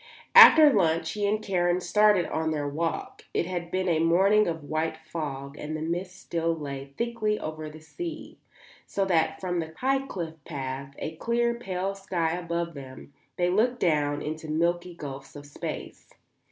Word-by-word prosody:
After 320 - +10
lunch 165 -4 +2
he 205 -1 -1
and 215 +1 0
Karen 175 -2 +1
started 205 0 +3
on 160 0 -1
their 150 -2 -1
walk. 160 +3 -3
It - - +1
had 175 -1 -4
been 185 +1 -1
a 165 -3 +2
morning 190 +6 +4
of 160 -2 -3
white 155 +2 -2
fog 145 -4 -6
and 155 +1 -4
the - - -6
mist 180 +3 -4
still 165 0 -1
lay 140 -3 -7
thickly 230 -3 -1
over 155 0 -5
the 155 +1 -12
sea, 335 - -7 0.5
so 195 - 0
that 160 -4 +1
from 180 -2 -2
the 160 -1 -5
high 270 +1 +1
cliff 165 - -6
path, 135 0 -6
a 160 0 -5
clear, 235 +4 +1
pale 195 -5 -3
sky 185 -4 -1
above 170 -1 -3
them, 135 0 -11 0.2
they 175 0 +2
looked 240 +6 +2
down 145 -3 +1
into 155 +1 -5
milky 175 +3 0
gulfs 140 -3 -8
of 145 0 -9
space. 145 - -7
170 Hz, 170 wpm, -27 LUFS, 155-195 Hz, 0.5 s, After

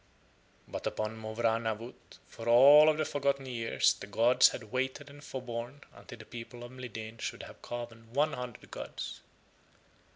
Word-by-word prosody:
But - - -4
upon 110 +1 -3
Mowrah 110 +1 0
Nawut 115 +1 -6
for 115 0 -6
all 145 +6 +9
of 155 - +2
the 155 - 0
forgotten 140 -1 0
years 115 -3 +2
the 100 - -10
gods 115 +5 +5
had 110 -4 -8
waited 130 +3 -2
and 145 +1 -13
forborne 125 +1 -6
until 120 - -12
the 110 - -12
people 120 +1 -9
of 120 - -9
Mlideen 115 -3 -8
should - - -4
have - - -12
carven 115 -2 -7
one 150 +5 +2
hundred 125 -2 -7
gods. - - -6
120 Hz, 160 wpm, -31 LUFS, 115-130 Hz, -, all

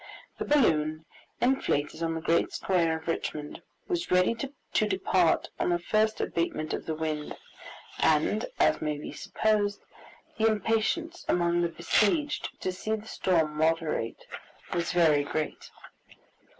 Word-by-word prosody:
The - - -2
balloon, 155 - +2 0.4
inflated 165 - +1
on 165 0 -1
the 160 - -3
great 165 +1 +2
square 170 -4 +1
of 160 - -13
Richmond, 150 -2 -3 0.3
was 350 -1 -2
ready 180 +4 +4
to 240 -3 -2
depart 190 -3 +2
on - - +1
the 175 - +3
first 215 +5 +1
abatement 155 -2 -2
of - - -4
the 160 - -1
wind, 155 -1 -3 0.6
and, - - +2
as - - +3
may 150 -1 -1
be 145 - -7
supposed, 205 0 0 0.6
the 220 - +4
impatience 225 - 0
among 175 0 +2
the 170 - +1
besieged 215 - +1
to 185 - -1
see 215 +4 -2
the 215 0 -9
storm 160 -8 +1
moderate 160 -6 0 0.5
was 170 -1 -1
very 160 -5 +4
great. 155 +2 -4
175 Hz, 135 wpm, -28 LUFS, 160-215 Hz, 0.6 s, ready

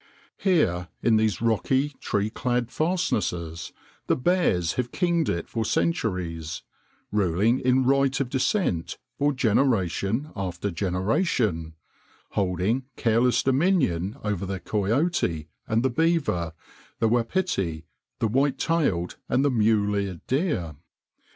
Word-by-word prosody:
Here 95 - +2 0.2
in 115 -2 +4
these 110 -1 +1
rocky, 130 +5 +2
tree 105 +1 -1
clad 120 0 -1
fastnesses 95 - -1 0.4
the - - +3
bears 130 - +1
have 125 -1 -2
kinged 170 -3 +1
it 85 -1 -2
for 115 - -2
centuries, 90 - -1 0.5
ruling 105 +5 +2
in 130 +1 +3
right 135 0 +3
of 135 - 0
descent 130 - 0 0.2
for 145 +1 +3
generation 115 - +1
after 95 0 -3
generation, 90 - 0 0.6
holding 100 +7 0
careless 120 +1 +2
dominion 130 - +1
over 105 -3 -2
the 95 0 -3
coyote 105 - 0 0.2
and 115 +2 +1
the 130 - +2
beaver, 140 - +1 0.4
the 115 - +2
wapiti, 115 - 0 0.3
the 115 - +1
white 135 +5 +1
tailed 140 - 0
and 135 +3 +2
the 140 - +3
mule 105 -3 +2
eared 100 -4 -3
deer. 130 - -1
115 Hz, 120 wpm, -25 LUFS, 90-135 Hz, 0.6 s, in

